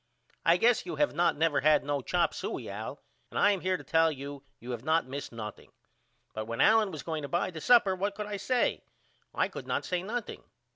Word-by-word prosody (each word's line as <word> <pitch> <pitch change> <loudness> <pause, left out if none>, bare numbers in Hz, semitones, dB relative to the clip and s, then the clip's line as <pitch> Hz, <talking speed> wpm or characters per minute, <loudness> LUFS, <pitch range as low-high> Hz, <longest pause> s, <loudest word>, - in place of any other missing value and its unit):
I 170 +1 +5
guess 235 +5 +3
you 360 - -3
have 295 - +1
not 175 -3 +2
never 160 -1 +2
had 155 0 +4
no 145 -1 -1
chop 175 +5 +1
suye - - -5
Al - - -6 0.3
and - - -6
I 205 - +5
am 195 -3 -1
here 185 0 0
to - - -11
tell 160 0 +3
you 140 0 -7 0.2
you 125 +2 -7
have 120 -1 -5
not 160 +1 +2
missed 140 +2 -6
nothing 110 -2 -8 0.6
but 110 0 -4
when 115 +1 -5
Allen 220 -1 +5
was 155 -7 -7
going 160 +1 -3
to 140 - -5
buy 175 +4 -1
the 160 -3 -8
supper 205 0 +5
what 200 +2 -2
could 210 - -4
I 205 -1 -4
say? 245 +5 0 0.5
I - - +1
could - - -9
not - - -1
say 180 -1 -1
nothing. 220 +4 -5
165 Hz, 230 wpm, -29 LUFS, 145-200 Hz, 0.6 s, I